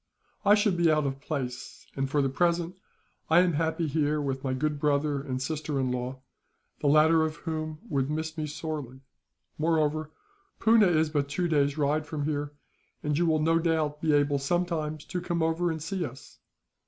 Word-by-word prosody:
I 205 0 +6
should 205 -4 +2
be 170 -1 +4
out 155 -1 +2
of 135 0 -3
place 130 -5 -5
and, 135 -1 -1
for 145 0 +2
the 135 - +1
present, 170 +4 0 0.5
I 165 +2 +6
am 180 -2 +2
happy 160 +2 0
here 150 0 +1
with 135 -2 -3
my 130 -1 -1
good 150 +2 -1
brother 145 -1 +1
and 130 -2 -4
sister 150 +1 -2
in 130 -1 0
law, 125 +1 -4 0.6
the - - 0
latter 155 +2 +5
of 160 0 -1
whom 155 -2 -4
would 135 - 0
miss 155 +1 -3
me 155 -1 -3
sorely. 150 -4 -5 0.6
Moreover, 155 -1 +1 0.5
Poona 220 -2 +5
is 160 -2 +2
but 145 -2 0
two 175 +4 0
days' 145 -2 +1
ride 150 +1 +1
from 145 -1 -3
here, 145 -1 -2 0.5
and 150 -1 0
you 170 +3 +2
will 155 -1 +2
no 165 +1 +3
doubt 160 -3 0
be 160 - +2
able 145 -1 +3
sometimes 155 0 -1
to 180 - -4
come 170 -2 -1
over 165 +2 +1
and 160 -2 -3
see 185 +2 -2
us. 135 -3 -9
155 Hz, 190 wpm, -28 LUFS, 145-165 Hz, 0.6 s, I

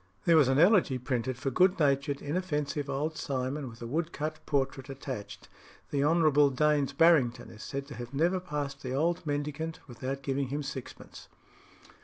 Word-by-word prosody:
There 170 - +5
was 150 -5 +6
an 135 0 +2
elegy 175 - +5
printed 125 -1 -2
for 135 +2 -2
good 185 +7 +4
natured, 140 -1 +1
inoffensive 150 -3 -2
old 150 +3 -2
Simon, 135 -1 -3
with 115 0 -11
a - - -4
woodcut 155 +2 -3
portrait 135 -1 -1
attached. 130 -5 -7 0.4
The 140 -1 +1
Hon. 165 +3 +3 0.3
Daines 150 -1 +2
Barrington 155 -8 +4
is 110 - -12
said 140 0 -5
to 145 - -10
have 120 -2 -7
never 170 +6 +1
passed 145 -5 -4
the 130 0 -3
old 170 +5 +1
mendicant 150 +2 -3
without 130 +2 -5
giving 135 0 -1
him 145 +3 -3
sixpence. 135 -2 -8
140 Hz, 165 wpm, -30 LUFS, 135-155 Hz, 0.4 s, was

